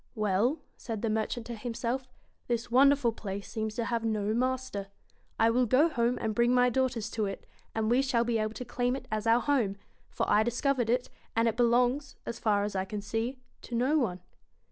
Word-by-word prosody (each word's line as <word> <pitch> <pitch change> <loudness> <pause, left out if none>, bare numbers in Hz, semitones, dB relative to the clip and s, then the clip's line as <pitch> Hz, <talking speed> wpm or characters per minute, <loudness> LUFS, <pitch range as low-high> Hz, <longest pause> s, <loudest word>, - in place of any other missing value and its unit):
'Well,' 215 +6 +1 0.2
said 225 -2 -5
the 225 - +1
merchant 220 +2 -2
to 240 - -5
himself, 240 +3 -3 0.4
'this 235 0 -2
wonderful 275 -1 +5
place 200 -2 -6
seems 220 -1 -3
to 235 - -1
have 230 -1 -1
no 215 -2 0
master. 255 -4 -1 0.5
I 225 0 +4
will 245 +1 +2
go 275 +8 +4
home 240 -4 +1
and 220 -1 -1
bring 240 +3 +3
my 250 0 +4
daughters 245 -3 0
to 215 -2 -1
it, 195 - -6 0.3
and 220 -1 0
we 250 +2 +4
shall 250 -4 +1
be 235 -1 0
able 215 +1 -2
to 250 - -6
claim 245 +1 0
it 275 - -8
as 215 +1 -1
our 230 +2 +5
home; 240 -9 +1 0.3
for - - -2
I 210 - +4
discovered 240 +1 0
it, 245 +1 0 0.2
and 230 +1 +3
it 225 - +1
belongs, 245 +3 +2
as 235 - -5
far 205 -2 +2
as 205 -1 -3
I 190 - +1
can 205 +1 -5
see, 225 +5 -2 0.2
to 240 - -6
no 255 +6 +2
one.' 185 -9 -1
235 Hz, 210 wpm, -30 LUFS, 215-250 Hz, 0.5 s, wonderful